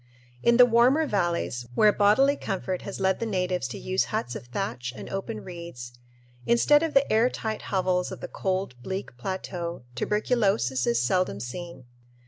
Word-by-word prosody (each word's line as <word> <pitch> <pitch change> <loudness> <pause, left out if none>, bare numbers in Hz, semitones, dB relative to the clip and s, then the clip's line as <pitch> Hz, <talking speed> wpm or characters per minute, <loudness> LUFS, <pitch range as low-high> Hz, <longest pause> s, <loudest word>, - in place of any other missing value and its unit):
In 235 0 +4
the 250 - +9
warmer 245 +6 +4
valleys, 170 - -1
where 210 +5 +5
bodily 240 +8 +4
comfort 190 -6 -3
has 200 - -7
led 190 0 +1
the 230 - -2
natives 180 -7 -1
to 125 - -7
use 185 +1 0
huts 120 +1 -3
of 120 - -8
thatch 125 0 -3
and - - -8
open 195 - -4
reeds, 170 -9 -8 0.5
instead 295 +5 +4
of 325 -3 -2
the 275 -3 +4
air 225 +3 +4
tight 220 -3 -4
hovels 185 -2 0
of - - -7
the - - -6
cold, 190 -5 -2
bleak 190 -2 -5
plateau, 170 +2 -5
tuberculosis 195 - +1
is 120 0 +2
seldom 125 - +1
seen. 135 +4 -7
185 Hz, 165 wpm, -26 LUFS, 130-215 Hz, 0.5 s, the